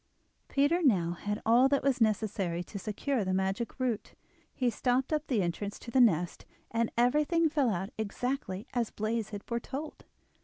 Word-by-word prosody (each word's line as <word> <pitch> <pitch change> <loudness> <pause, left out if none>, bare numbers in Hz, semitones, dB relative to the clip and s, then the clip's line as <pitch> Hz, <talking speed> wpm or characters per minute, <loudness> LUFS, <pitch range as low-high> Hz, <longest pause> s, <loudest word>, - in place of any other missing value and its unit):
Peter 290 +6 +2
now 190 - +3
had 205 +4 -3
all 245 +4 +5
that 280 0 +2
was 265 -3 +1
necessary 200 -5 +1
to 200 +3 -7
secure 220 +5 -1
the 185 0 0
magic 195 +7 -2
root; 245 -5 -2 0.4
he 255 - -1
stopped 250 +4 +1
up 305 0 -1
the 225 -8 +1
entrance 200 +4 -3
to 235 - -9
the 260 - +5
nest, 175 -7 +2 0.3
and 230 0 0
everything 300 +7 +3
fell 290 -5 +2
out 195 0 -2
exactly 220 -2 -3
as 240 -3 0
Blaize 215 0 -2
had 205 -1 -6
foretold. 270 +6 -5
230 Hz, 165 wpm, -30 LUFS, 200-265 Hz, 0.4 s, all